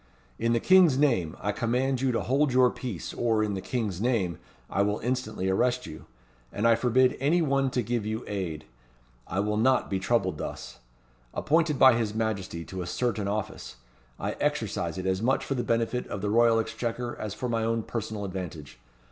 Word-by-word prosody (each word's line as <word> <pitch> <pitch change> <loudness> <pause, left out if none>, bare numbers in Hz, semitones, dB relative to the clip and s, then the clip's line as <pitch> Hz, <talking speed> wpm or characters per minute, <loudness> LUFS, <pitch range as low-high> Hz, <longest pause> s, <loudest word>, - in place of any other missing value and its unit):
In 115 0 +1
the 115 - +2
King's 180 -3 +5
name, 120 - +1
I 105 - -1
command 125 +4 0
you 135 -1 +2
to 115 - 0
hold 140 +2 +2
your 125 0 +5
peace, 120 -10 -6
or, 110 -2 +1
in 105 -1 -1
the 95 - -3
King's 105 -3 -3
name, 105 -9 0 0.3
I 100 - 0
will 105 +1 +1
instantly 120 -5 -2
arrest 125 +6 +1
you; 75 - -10 0.4
and 105 +3 +1
I 115 - +6
forbid 125 +2 +3
any 160 +6 +2
one 135 -2 +1
to 125 -1 -1
give 120 0 -1
you 110 +2 -3
aid. 85 -7 -4 0.6
I 95 +3 -1
will 105 +1 -1
not 130 +1 +2
be 95 - 0
troubled 95 -5 0
thus. - - -7 0.6
Appointed 155 -1 +2
by 130 -1 +8
his 110 -3 -1
Majesty 100 -7 -2
to 95 -1 -6
a 85 - -5
certain 110 0 -1
office, 100 - -4 0.4
I - - -2
exercise - - -1
it 95 - -4
as 95 +1 0
much 130 +4 +1
for - - -1
the 125 -2 -1
benefit 115 +1 0
of 100 - -5
the 105 0 -1
Royal 115 0 +5
Exchequer, 115 +2 -3
as 105 -1 -5
for 125 - -3
my 115 -2 0
own 115 0 0
personal 110 -3 -4
advantage. 90 -6 -7
115 Hz, 195 wpm, -27 LUFS, 100-125 Hz, 0.6 s, by